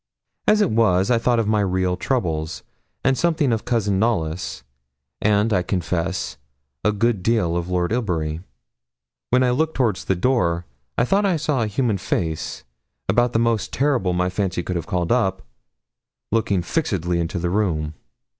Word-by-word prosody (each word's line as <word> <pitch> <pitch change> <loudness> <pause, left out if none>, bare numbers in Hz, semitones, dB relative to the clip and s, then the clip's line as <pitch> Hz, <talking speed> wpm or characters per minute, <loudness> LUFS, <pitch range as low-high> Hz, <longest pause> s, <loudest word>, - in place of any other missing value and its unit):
As 215 0 +5
it 205 - +2
was, 105 -3 +3
I 120 - +4
thought 120 +1 +2
of 115 -2 +1
my 105 0 +2
real 95 -2 +1
troubles, 80 - -2 0.4
and 135 0 +3
something 155 -3 +2
of 110 - -2
Cousin 105 -5 +1
Knollys, 85 - -1 0.6
and, 105 +1 +3
I 90 - +3
confess, 90 0 -2 0.5
a 105 - +3
good 105 -1 +1
deal 95 -5 +1
of 85 0 -2
Lord 90 0 0
Ilbury. 85 -9 -1 0.9
When 125 +1 +4
looking 155 +6 +1
towards 115 -7 0
the 95 - +1
door, 90 -6 +1 0.3
I 115 - +3
thought 200 +9 +2
I 180 -4 +2
saw 150 -4 0
a 110 - +1
human 105 -1 0
face, 80 -4 -2 0.4
about 120 0 +2
the - - +3
most 115 -2 +1
terrible 130 -10 +1
my 90 +1 0
fancy 95 -2 -1
could 90 - -3
have 85 -2 -3
called 90 -2 -1
up, 95 -6 +1 0.9
looking 100 -5 +1
fixedly 90 - -1
into 85 +2 -2
the 85 0 -1
room. 80 -7 0
100 Hz, 165 wpm, -22 LUFS, 90-120 Hz, 0.9 s, As